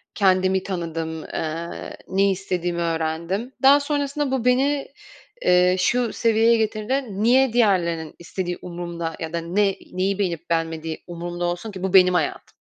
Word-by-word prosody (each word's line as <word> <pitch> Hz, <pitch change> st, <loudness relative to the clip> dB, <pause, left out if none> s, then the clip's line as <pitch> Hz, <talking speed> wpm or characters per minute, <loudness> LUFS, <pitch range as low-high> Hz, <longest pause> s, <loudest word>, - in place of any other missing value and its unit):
kendimi 190 Hz, -1 st, +3 dB
tanıdım, 165 Hz, -3 st, -4 dB
ııı, 165 Hz, +2 st, -5 dB, 0.2 s
ne 195 Hz, +1 st, +2 dB
istediğimi 180 Hz, -2 st, -2 dB
öğrendim. 165 Hz, +7 st, -2 dB
Daha 280 Hz, +2 st, +8 dB
sonrasında 285 Hz, -1 st, -1 dB
bu 255 Hz, -2 st, -1 dB
beni, 275 Hz, +3 st, +2 dB, 0.6 s
ııı, 180 Hz, +1 st, +5 dB
şu 235 Hz, +5 st, +1 dB
seviyeye 230 Hz, 0 st, +3 dB
getirdi: 220 Hz, +5 st, -1 dB, 0.2 s
"Niye 255 Hz, +1 st, +4 dB
diğerlerinin 170 Hz, -8 st, +1 dB
istediği 175 Hz, +1 st, -4 dB
umurumda 170 Hz, -2 st, -5 dB
ya 160 Hz, 0 st, -5 dB
da 170 Hz, -, -1 dB
ne 195 Hz, +4 st, +1 dB, 0.2 s
neyi 190 Hz, +2 st, 0 dB
beğenip 170 Hz, -4 st, -2 dB
beğenmediği 165 Hz, -1 st, -2 dB
umurumda 175 Hz, 0 st, -4 dB
olsun 175 Hz, +5 st, -3 dB
ki 190 Hz, -2 st, -8 dB
bu 190 Hz, -1 st, -1 dB
benim 185 Hz, -1 st, +7 dB
hayatım?" 160 Hz, -4 st, -2 dB
185 Hz, 140 wpm, -23 LUFS, 170-220 Hz, 0.6 s, Daha